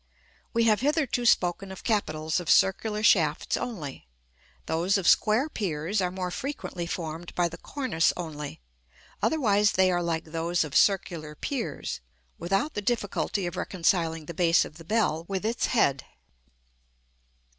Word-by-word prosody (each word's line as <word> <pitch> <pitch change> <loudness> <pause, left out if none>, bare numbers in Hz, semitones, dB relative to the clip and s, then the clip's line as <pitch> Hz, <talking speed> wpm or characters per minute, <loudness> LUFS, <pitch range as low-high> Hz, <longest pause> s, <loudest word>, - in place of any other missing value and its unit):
We 230 -1 +2
have 220 -1 +3
hitherto 275 -4 +1
spoken 190 -2 +2
of 190 - -9
capitals 160 -6 0
of 175 -5 -6
circular 210 +2 +3
shafts 155 -8 +3
only: 150 - -5 0.6
those 175 +5 +1
of 190 - -2
square 220 +7 +4
piers 190 - -2
are 180 - +1
more 180 0 -4
frequently 185 -8 -5
formed 165 0 -5
by 175 -1 +2
the 165 - -9
cornice 255 - 0
only; 150 - -6 0.6
otherwise 210 -9 +3
they 185 0 +4
are 175 0 +1
like 165 -2 -1
those 165 +2 -1
of 150 -2 -7
circular 170 -6 +2
piers, 200 - -4 0.4
without 195 - 0
the 205 - -3
difficulty 205 -3 -1
of 175 - -4
reconciling 165 -3 0
the 170 - -7
base 170 0 +3
of 155 - -11
the - - -10
bell 165 -5 0
with 195 +1 -3
its 230 +2 0
head. 140 - +2
180 Hz, 145 wpm, -27 LUFS, 165-215 Hz, 0.6 s, square